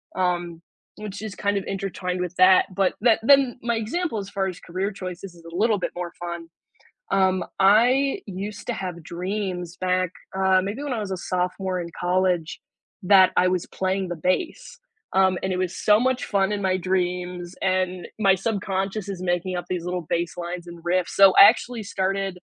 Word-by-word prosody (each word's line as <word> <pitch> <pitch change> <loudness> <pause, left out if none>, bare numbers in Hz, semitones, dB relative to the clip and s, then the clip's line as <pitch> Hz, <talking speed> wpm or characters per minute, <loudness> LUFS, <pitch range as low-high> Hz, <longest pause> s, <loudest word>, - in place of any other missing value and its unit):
Um, 175 -2 -1 0.4
which 210 -1 -7
is 215 -3 -6
kind 205 0 0
of 195 - -2
intertwined 185 -2 -3
with 180 0 -3
that 185 0 +6
but 190 0 +1
that 230 -2 +4
then 270 -1 +4
my 235 0 0
example 230 +5 -2
as 200 -1 -5
far 195 -1 -1
as 180 -2 -6
career 190 +4 -3
choices 185 -1 -7
is 170 - -17
a - - -9
little 215 +2 +2
bit - - -3
more 175 -1 -5
fun. 170 -1 -6 0.7
Um, 190 -1 +2 0.2
I 250 - +4
used 200 +2 -6
to 245 - -1
have 180 -3 -5
dreams 180 0 -4
back, 185 -1 +1 0.3
uh, 190 -1 +4
maybe 205 +9 -4
when 285 -3 -3
I 230 - -2
was 195 -2 -4
a - - -2
sophomore 180 +1 -2
in 170 - -5
college 180 -2 0 0.4
that 185 -1 +6
I 185 - +4
was 185 -2 0
playing 190 0 -2
the 175 - -4
bass. 345 - -2 0.3
Um, 190 -1 +3
and 190 0 -1
it - - -1
was 185 -1 -2
so 210 +1 +4
much 255 0 +1
fun 195 -1 +1
in 205 - -2
my 185 -1 +2
dreams 180 -1 -2
and 185 -1 0
my 195 -3 +4
subconscious 195 0 -2
is 185 -2 -5
making 180 +1 -1
up 175 -1 -5
these 175 -2 -2
little 180 -2 -3
baselines 175 +1 -3
and 170 -1 -11
riffs. 180 +1 0
So, 195 -1 +6
I - - +13
actually 235 -1 -1
started 195 -1 -2
185 Hz, 190 wpm, -24 LUFS, 180-200 Hz, 0.7 s, I